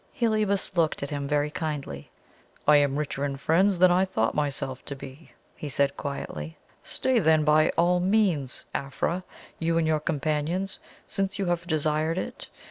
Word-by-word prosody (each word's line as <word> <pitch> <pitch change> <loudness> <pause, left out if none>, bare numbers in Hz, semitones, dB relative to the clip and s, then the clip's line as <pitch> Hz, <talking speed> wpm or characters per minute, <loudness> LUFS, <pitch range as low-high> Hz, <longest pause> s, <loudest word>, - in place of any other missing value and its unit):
Heliobas 215 -6 +1
looked 160 -4 +1
at 140 - -4
him 140 -1 -3
very 150 +1 +1
kindly. 145 - -4 0.6
"I 150 0 +8
am 140 -1 +2
richer 145 -2 -2
in 140 -1 -2
friends 180 +7 +3
than 180 +1 +6
I 180 +2 +4
thought 150 -13 0
myself 135 -3 -2
to 140 - -5
be," 135 +3 -11 0.3
he 150 - -6
said 140 0 +1
quietly. 80 - -5 0.3
"Stay 260 -2 +1
then, 160 -4 +4
by 155 +1 +4
all 175 +1 +4
means, 180 - +1
Afra, 165 +6 -2 0.4
you 165 0 +1
and 165 - +2
your 155 -1 +2
companions, 155 +5 -1 0.3
since 195 -1 -2
you 195 - -1
have 175 -1 -1
desired 155 +1 0
it. - - -5
155 Hz, 165 wpm, -27 LUFS, 145-180 Hz, 0.6 s, I